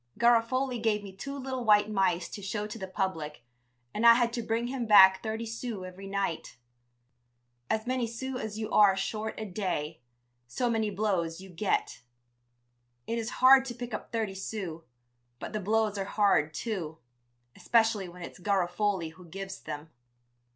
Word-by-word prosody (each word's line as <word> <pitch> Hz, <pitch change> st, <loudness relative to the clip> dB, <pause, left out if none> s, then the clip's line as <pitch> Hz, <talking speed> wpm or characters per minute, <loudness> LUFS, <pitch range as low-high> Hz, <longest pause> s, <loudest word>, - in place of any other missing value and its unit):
Garofoli 240 Hz, +1 st, +2 dB
gave 210 Hz, -2 st, +1 dB
me 200 Hz, -, -8 dB
two 275 Hz, +8 st, -6 dB
little 260 Hz, -2 st, -4 dB
white 210 Hz, -2 st, +5 dB
mice 190 Hz, -4 st, +1 dB
to 205 Hz, -, -8 dB
show 205 Hz, +2 st, -3 dB
to 215 Hz, +2 st, -7 dB
the 190 Hz, -, -5 dB
public 165 Hz, -, -3 dB, 0.5 s
and 215 Hz, -, -2 dB
I 235 Hz, 0 st, +9 dB
had 235 Hz, -1 st, +1 dB
to 240 Hz, -, -2 dB
bring 225 Hz, +1 st, -1 dB
him 245 Hz, -1 st, -3 dB
back 190 Hz, -2 st, +8 dB
thirty 220 Hz, +1 st, -3 dB
sous 225 Hz, -3 st, -5 dB
every 185 Hz, +2 st, -9 dB
night. 195 Hz, -9 st, -3 dB, 1.1 s
As 220 Hz, 0 st, 0 dB
many 255 Hz, -1 st, 0 dB
sous 255 Hz, +3 st, -5 dB
as 215 Hz, -1 st, -5 dB
you 220 Hz, 0 st, -4 dB
are 200 Hz, -2 st, +6 dB
short 215 Hz, +3 st, -3 dB
a 220 Hz, -, -4 dB
day, 180 Hz, -7 st, -3 dB, 0.5 s
so 240 Hz, -, -1 dB
many 220 Hz, -2 st, 0 dB
blows 190 Hz, -5 st, -1 dB
you 190 Hz, 0 st, -11 dB
get. 175 Hz, -, -1 dB, 1.0 s
It 230 Hz, 0 st, -2 dB
is 225 Hz, 0 st, -3 dB, 0.2 s
hard 265 Hz, 0 st, +9 dB
to 240 Hz, -2 st, -5 dB
pick 245 Hz, -1 st, -7 dB
up -, -, -6 dB
thirty 220 Hz, -4 st, -1 dB
sous, 190 Hz, -4 st, -5 dB, 0.6 s
but -, -, -7 dB
the 215 Hz, -, -1 dB
blows 210 Hz, 0 st, +1 dB
are 195 Hz, -, -2 dB
hard, 200 Hz, -7 st, +2 dB
too, 175 Hz, -9 st, -4 dB, 0.6 s
especially 225 Hz, -5 st, +2 dB
when 175 Hz, 0 st, -10 dB
it's -, -, -9 dB
Garofoli 190 Hz, -2 st, 0 dB
who 180 Hz, +2 st, -15 dB
gives 195 Hz, +3 st, -7 dB
them. 150 Hz, +1 st, -7 dB
210 Hz, 170 wpm, -29 LUFS, 190-230 Hz, 1.1 s, I